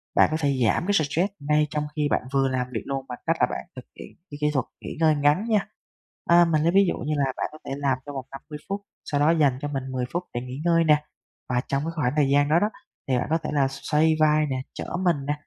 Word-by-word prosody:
bạn - - +6
có 155 - +1
thể 140 -3 +1
giảm 110 +10 +1
cái 205 - +2
stress 170 +3 +1
ngay 150 +1 +2
trong 150 0 -2
khi 150 -1 +1
bạn - - +2
vừa 135 -1 +3
làm 125 -1 -1
việc 110 - -2
luôn 135 -1 -3
bằng 125 - -6
cách 165 - +2
là - - +5
bạn - - -5
thực 130 - -9
hiện - - -11 0.2
cái 145 - -7
kỹ 150 - +3
thuật 130 -4 0 0.2
nghỉ - - -7
ngơi 160 -2 +4
ngắn 145 +7 +2
nha. 215 -2 +2 0.6
À, 170 0 +7
mình 160 -2 +1
lấy 170 - +3
ví 195 +2 +5
dụ - - -2
như 150 +3 -2
là 140 - +2
bạn - - -1
có 155 - -11
thể - - -6
làm 140 -2 +1
trong 145 -1 -7
vòng 130 -2 -5
50 150 +2 -9
phút, 200 +1 -2 0.2
sau 145 - -1
đó 145 +2 +4
dành 145 -6 +3
cho 145 - -2
mình 135 -2 -3
10 130 -1 -2
phút 175 +1 -1
để 120 - -2
nghỉ 125 +3 -7
ngơi 165 -1 +4
nè, 150 -2 +4 0.5
và 125 -1 +1
trong 140 +1 -1
cái 165 - -3
khoảng 130 -6 0
thời 145 -3 +3
gian 145 +1 +3
đó 160 +3 +5
đó, 210 - +1 0.4
thì 130 -2 +2
bạn 125 - -1
có 160 - +3
thể - - -3
là 140 -2 +3
xoay 150 +3 +1
vai 155 0 +4
nè, 130 -3 -2
trở - - -6 0.2
mình 170 -4 +3
nè, 145 - +1
150 Hz, 280 wpm, -25 LUFS, 135-160 Hz, 0.6 s, À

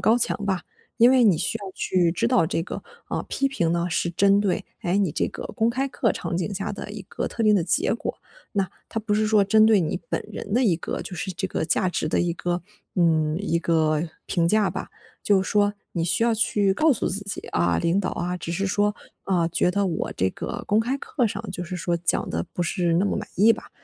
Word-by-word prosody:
高 225 +2 +4
墙 210 -3 0
吧。 190 -2 0 0.4
因 240 +2 +7
为 255 -2 +5
你 190 -7 +5
需 170 - -1
要 195 -2 -8
去 175 -3 +1
知 115 -9 0
道 165 - +3
这 165 -1 -1
个， - - -6 0.3
啊， - - -3
批 275 - 0
评 170 -11 0
呢 170 0 0
是 170 - 0
针 200 +3 +4
对， 195 -3 0 0.2
诶， 180 0 +1
你 190 -6 +2
这 - - 0
个 - - -7
公 225 0 +3
开 265 +3 -1
课 240 -4 0
场 170 - -3
景 190 +3 -2
下 195 +1 -3
的 205 - -7
一 210 -2 -7
个 - - -3
特 230 - -3
定 210 -1 +5
的 170 - +1
结 185 - +2
果， 235 - -3 0.4
那 195 -3 0 0.2
它 225 - -3
不 210 -1 -2
是 215 +1 +2
说 215 -2 +4
针 215 +2 +5
对 215 -4 +5
你 170 +2 -2
本 - - -1
人 - - -6
的 250 +3 +3
一 185 -8 +3
个 - - -4
就 180 - -7
是 190 +2 -3
这 170 - -3
个 - - -2
价 180 +3 +1
值 155 - -1
的 - - +1
一 175 -1 0
个， 175 0 -2 0.3
嗯， 160 -3 +2
一 170 -4 0
个 160 -1 +1 0.2
评 170 -3 +1
价 210 +1 +3
吧。 - - -6 0.3
就 200 -2 +4
是 - - -5
说 205 -1 +3 0.2
你 165 -2 -1
需 185 +6 +1
要 235 - +3
去 205 -2 +2
告 310 +3 +4
诉 230 - -1
自 195 +2 -2
己， 200 - -4
啊， 85 -1 +1
领 170 - +1
导 190 - -2
啊， 180 +1 -2
只 170 - -6
是 195 +3 -1
说， 205 +2 +1 0.3
啊， 175 -4 +1
觉 175 +1 +1
得 200 +1 +1
我 170 - -2
这 95 - +1
个 - - -6
公 210 +1 +3
开 255 +4 -1
课 250 -4 -1
上 - - -4
就 180 - -4
是 180 +1 -5
说 175 -1 -1
讲 170 +1 0
得 85 +1 -2
不 - - -5
是 170 0 0
那 180 +4 +3
么 - - 0
满 205 0 -4
意 220 +4 +6
吧， - - -9
190 Hz, 265 characters per minute, -24 LUFS, 170-210 Hz, 0.4 s, 因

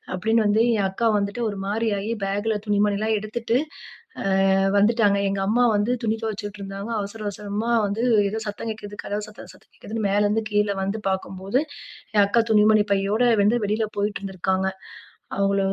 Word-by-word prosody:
அப்டின்னு 220 +3 +1
வந்து 215 +2 +3
என் 195 -2 +1
அக்கா 225 +4 0
வந்துட்டு 200 +4 -2
ஒரு 200 -1 -6
மாரியாகி 210 0 -1
பேக்குல 205 +2 -1
துணி 205 -1 +1
மணி 205 -1 0
எல்லாம் 220 0 +1
எடுத்துட்டு 225 +3 -1 1.0
ஆ - - +3 0.2
வந்துட்டாங்க." 210 -1 +3
எங்க 195 0 -2
அம்மா 245 +3 +3
வந்து 205 +4 0
துணி 220 0 0
துவைச்சுட்டு 205 -1 -5
இருந்தாங்க. 195 +3 -6
அவசர 205 +2 -6
அவசரமா 210 +3 -3
வந்து 210 +4 -2 0.3
ஏதோ 220 - -3
சத்தம் 220 +2 -5
கேட்குது, 205 -1 -9
கதவு 210 +1 -3
சத்தம் 210 - -12
சத்தம் - - -23
கேட்குதுன் 220 -1 -4
மேல 205 +1 +2
இருந்து 220 +2 0
கீழ 210 0 +2
வந்து 200 +3 -2
பாக்கும்போது, 190 +3 -2 0.6
என் 205 - +7
அக்கா 230 +4 +3
துணிமணி 215 0 +5
பையோட 195 0 +1 0.3
வந்து 210 +4 +3
வெளில 215 +2 0
போயிட்டு 205 +1 -1
இருந்திருக்காங்க. 190 -1 -1 0.7
அவங்கள 195 0 +2
205 Hz, 170 wpm, -23 LUFS, 200-220 Hz, 1.0 s, என்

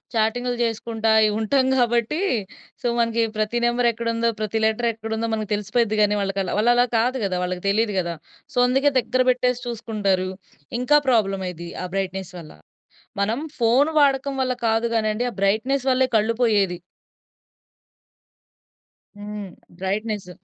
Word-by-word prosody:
చాటింగ్లు 245 +3 0
చేసుకుంటా 225 -1 -1 0.3
ఉంటాం. 260 +5 +2
కాబట్టి 240 +4 +1 0.6
సో - - -1
మనకి 230 0 +1 0.2
ప్రతి 215 +2 0
నెంబర్ 240 0 +2
ఎక్కడుందో, 230 0 -1
ప్రతి 215 +1 -1
లెటర్ 220 +2 +1
ఎక్కడుందో, 225 +1 -3
మనకి 215 -1 -3
తెలిసిపోయిద్ది 210 +2 0
కానీ 210 0 +3
వాళ్ళకలా 195 -1 -2
వాళ్ళలా 240 +2 +4
కాదు 250 +4 +1
గదా, 185 -2 -1
వాళ్ళకి 180 0 -4
తెలీదు 210 0 +1
గదా. 170 -1 -2 0.4
సో - - -6
అందుకే 270 +3 +3
దగ్గర 255 +1 +1
పెట్టేసి 250 0 0
చూసుకుంటారు. 205 -5 -1 0.5
ఇంకా 250 +4 +4
ప్రాబ్లమ్ 195 -5 +1
అయ్యిద్ది 170 -1 -8
ఆ - - -3
బ్రైట్‌నెస్ 190 -1 -3
వల్ల. 160 -2 -11 0.7
మనం 220 +5 0 0.2
ఫోను 245 +6 +3
వాడకం 275 -1 +2
వల్ల 255 -1 +1
కాదు 225 +1 +1
గానిండి, 215 +1 0
ఆ - - -13
బ్రైట్‌నెస్ 235 +7 +1
వల్లే 260 0 +3
కళ్ళు 220 +2 +1
పోయేది. 200 -6 +2 2.4
హ్మ్. 205 0 -7 0.3
బ్రైట్‌నెస్. 205 0 -2
225 Hz, 135 wpm, -23 LUFS, 205-240 Hz, 2.4 s, వాళ్ళలా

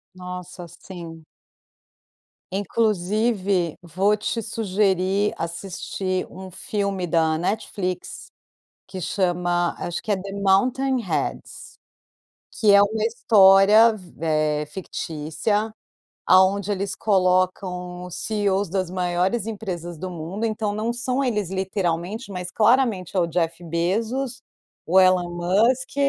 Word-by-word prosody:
Nossa, 180 -1 -8
sim. 165 -2 -10 1.3
Inclusive, 200 -2 0
vou 185 +5 +1
te 220 +2 -3
sugerir 200 -2 +1
assistir 185 +2 -3
um 190 0 -10
filme 200 -1 -2
da 160 -1 +2
Netflix 185 -1 -3 0.6
que 185 - -7
chama, 175 -1 0
acho 175 - -4
que 215 - -3
é - - +3
The 195 +1 -7
Mountain 255 +7 +2
Heads, 195 - -4 0.8
que 210 -3 +3
é 200 - +8
uma 215 +1 0
história 215 0 +6
v 185 -4 -13 0.5
eh, - - -6
fictícia, 165 +5 -3 0.5
aonde 190 +2 +4
eles 200 0 -2
colocam 180 -2 0
os 180 - -8
CEOs 200 -3 0
das 185 -1 -1
maiores 180 +4 0
empresas 175 -6 -5
do 185 +3 -5
mundo, 175 +6 -4
então 215 -1 -1
não 220 +3 -2
são 255 +3 -1
eles 210 -7 -1
literalmente, 190 +3 -2
mas 180 -1 -5
claramente 215 -5 +2
é - - +5
o 170 - +3
Jeff 170 0 -2
Bezos, 225 +10 -2 0.4
o 185 +3 +5
Elon 185 -1 +4
Musk, 210 +11 +1
190 Hz, 115 wpm, -23 LUFS, 180-215 Hz, 1.3 s, é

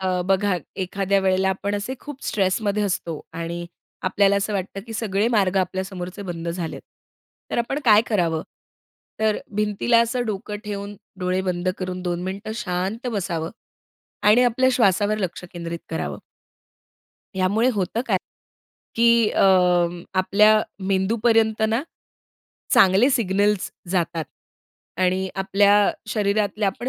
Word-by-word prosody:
अ, 185 -1 0
बघा 195 0 +2 0.3
एखाद्या 195 +1 0
वेळेला 190 0 +2
आपण 200 +2 -2
असे 210 +6 -3
खूप 290 -2 -9
स्ट्रेसमध्ये 205 +1 0
असतो 175 -5 -2
आणि 170 +1 -5 0.4
आपल्याला 200 +1 +3
असं 200 +1 -1
वाटतं, 195 0 -3
की 225 - -7
सगळे 210 -1 0
मार्ग 200 -5 +2
आपल्या 190 +1 -1
समोरचे 185 0 -7
बंद 170 -3 -5
झालेत. 170 -1 -4 0.7
तर - - -1
आपण 255 +4 -1
काय 215 -1 +6
करावं? 170 -7 0 0.8
तर 220 -1 +2 0.2
भिंतीला 210 +3 +2
असं 240 +1 0
डोकं 205 0 -4
ठेवून 205 0 -5 0.2
डोळे 185 +1 0
बंद 180 -1 -2
करून 185 -1 -4
2 175 -1 -2
मिनिटं 200 +3 -5
शांत 195 +3 -3
बसावं 170 -5 -2 0.8
आणि 240 +4 +6
आपल्या 255 +2 +3
श्वासावर 210 -2 +2
लक्ष 185 -2 -4
केंद्रित 170 -1 -5
करावं. 75 - -4 1.2
यामुळे 205 +6 +2
होतं 200 +3 -1
काय, - - +2 0.8
की 235 -1 +5
अ, - - +1 0.8
आपल्या 210 +3 +5 0.3
मेंदूपर्यंत 220 +3 +2
ना, 225 +4 0 0.9
चांगले 195 +8 +5
सिग्नल्स 205 -4 +1 0.2
जातात 170 -3 -1 0.8
आणि 185 +1 +1
आपल्या 200 +1 +4 0.2
शरीरातले 210 0 0
आपण 195 +6 -2
200 Hz, 125 wpm, -23 LUFS, 185-215 Hz, 1.2 s, काय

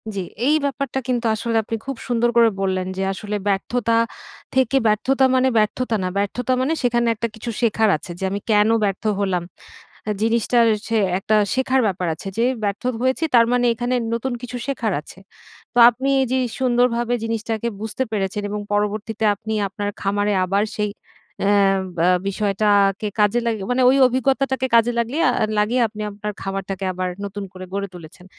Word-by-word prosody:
জি 195 - -1 0.3
এই 300 - +4
ব্যাপারটা 275 -1 -2
কিন্তু 245 -2 -1
আসলে 230 +1 -3
আপনি 225 - -4
খুব 270 -1 -4
সুন্দর 240 -1 +2
করে 230 -1 +6
বললেন, 185 -1 -1
যে 195 - -1
আসলে 210 +1 -5
ব্যর্থতা 230 +3 +1 0.6
থেকে 260 0 +3
ব্যর্থতা 265 +6 +2
মানে 260 +1 +3
ব্যর্থতা 220 +2 +1
না 185 - 0
ব্যর্থতা 245 +6 -1
মানে 295 +5 +1
সেখানে 240 -1 +2
একটা 230 +2 -2
কিছু 235 +2 -5
শেখার 220 -1 +2
আছে 160 - -14
যে, - - -5
"আমি 200 - -2
কেন 210 +1 +4
ব্যর্থ 195 -2 -1 0.2
হলাম?" 185 -3 0 0.8
জিনিসটা 230 +2 +2 0.3
সে 225 - 0 0.2
একটা 215 +3 0 0.2
শেখার 260 0 +2
ব্যাপার 185 -2 -1
আছে 175 - -8
যে, 235 - +3 0.2
"ব্যর্থ 200 +2 -2 0.2
হয়েছি 260 +5 +1
তার 230 -1 +7
মানে 245 0 +2
এখানে 245 +2 -2 0.2
নতুন 245 +2 -2
কিছু 245 0 -6
শেখার 240 -6 -1
আছে।" 160 - -15 0.6
তো - - 0
আপনি 260 +4 -4
এই 265 - +2
যে - - +2 0.2
সুন্দরভাবে 245 -1 +1
জিনিসটাকে 225 0 -2
বুঝতে 220 +3 -3
পেরেছেন 205 -1 -2
এবং 210 0 -3
পরবর্তীতে 215 +2 -1
আপনি 220 +2 -6 0.2
আপনার 205 +1 -4
খামারে 205 +1 0
আবার 200 +3 +1
সেই 210 -1 -1 0.5
অ্যা 200 - +2 0.5
বা 170 - +2 0.2
বিষয়টা 200 +1 -1 0.3
কে 215 - -2
কাজে 210 +3 +3
লাগি 220 -3 -1
মানে 255 +1 +2
ওই 270 - +3
অভিজ্ঞতাটাকে 265 +1 0
কাজে 230 +1 +5
লাগলি 235 +4 -1
আ - - +4 0.3
লাগিয়ে 230 +5 +2
আপনি 215 0 -7
আপনার 210 +1 -5
খামারটাকে 195 0 -4
আবার 185 0 -2 0.2
নতুন 200 0 -5
করে 185 -1 -9
গড়ে 200 0 -2
তুলেছেন। 175 +1 -12
220 Hz, 175 wpm, -21 LUFS, 200-245 Hz, 0.8 s, তার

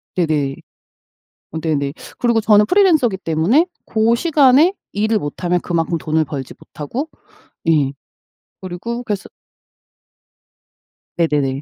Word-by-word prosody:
네네. 150 -6 0 1.0
어 160 - -4
네네. 145 -3 -1 0.3
그리고 235 -2 +2
저는 210 -1 +5
프리랜서기 315 - +3
때문에 185 - +2 0.2
고 225 +1 +2
시간에 295 +3 +4 0.2
일을 215 +2 +1
못하면 175 +3 -1
그만큼 170 -1 -1
돈을 155 0 0
벌지 140 -4 -6
못하고 245 - -6 0.6
예 145 -4 +3 0.7
그리고 210 +7 -5
그래서 205 -4 -4 1.9
네네네. 145 -5 0
180 Hz, 245 characters per minute, -18 LUFS, 155-235 Hz, 1.9 s, 저는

